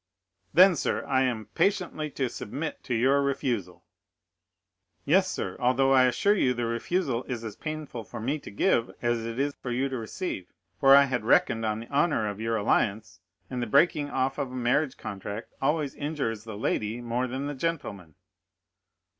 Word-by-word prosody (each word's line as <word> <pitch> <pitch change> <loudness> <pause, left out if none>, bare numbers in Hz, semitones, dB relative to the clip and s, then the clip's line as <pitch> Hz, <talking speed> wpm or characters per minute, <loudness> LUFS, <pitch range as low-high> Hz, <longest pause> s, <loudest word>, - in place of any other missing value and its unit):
"Then, 185 +1 +7
sir, - - -1
I 130 -1 +2
am 115 -4 -2
patiently 180 -6 0
to 135 -2 -2
submit 145 +6 -5
to 125 - -1
your 135 +5 +3
refusal?" 120 - -2 1.2
"Yes, 185 +5 +4
sir, - - -3
although 130 +2 +3
I 130 -1 +6
assure 165 +11 +3
you 130 -11 +2
the 120 0 -1
refusal 120 +2 -1
is 120 -3 -4
as 110 -3 -6
painful 155 -6 -6
for - - -8
me 135 +7 -1
to - - -10
give 115 +3 +1
as 120 -1 +1
it 115 +1 -5
is 140 +1 0
for 125 - -5
you 130 +3 0
to 130 - -3
receive, 110 - -5 0.3
for 135 0 +8
I 140 - +8
had 130 -4 -1
reckoned 115 0 +3
on 110 +1 -2
the 115 - -10
honor 140 -6 +1
of 105 +1 -5
your 115 0 0
alliance, 100 -4 0 0.3
and 125 -2 -4
the 120 - -2
breaking 145 +4 +3
off 135 0 -1
of 135 -2 -2
a - - -7
marriage 130 +3 +1
contract 100 +2 -6
always 150 0 0
injures 140 -8 -3
the 110 -2 -7
lady 110 +1 -1
more 120 +1 -1
than 130 +3 -4
the 145 - -3
gentleman." 130 - -4
130 Hz, 180 wpm, -27 LUFS, 115-145 Hz, 1.2 s, for